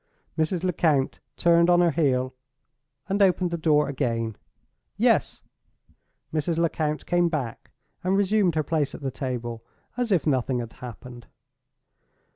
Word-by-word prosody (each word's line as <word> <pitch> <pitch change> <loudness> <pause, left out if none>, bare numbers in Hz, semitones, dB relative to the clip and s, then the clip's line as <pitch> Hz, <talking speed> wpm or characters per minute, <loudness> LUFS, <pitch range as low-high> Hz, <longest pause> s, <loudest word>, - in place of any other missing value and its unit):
Mrs. 160 +2 0
Lecount 155 -6 +1 0.2
turned 170 0 +4
on 175 0 +5
her 175 -1 +4
heel 130 -5 +1 0.7
and 200 +1 0
opened 185 -2 +3
the - - 0
door 150 -2 +3
again. 115 -5 -2 0.6
"Yes." - - +2 0.9
Mrs. 160 +1 0
Lecount 155 -2 -1
came 175 -1 +2
back, 135 -8 -4 0.3
and 185 +2 +2
resumed 200 -3 +2
her 155 - +1
place 150 -2 -1
at - - -10
the 135 -1 -2
table 120 -3 -4 0.3
as 245 -3 -1
if 180 -5 +2
nothing 130 -3 +1
had 120 -2 -5
happened. 120 0 -10
155 Hz, 135 wpm, -25 LUFS, 130-175 Hz, 0.9 s, on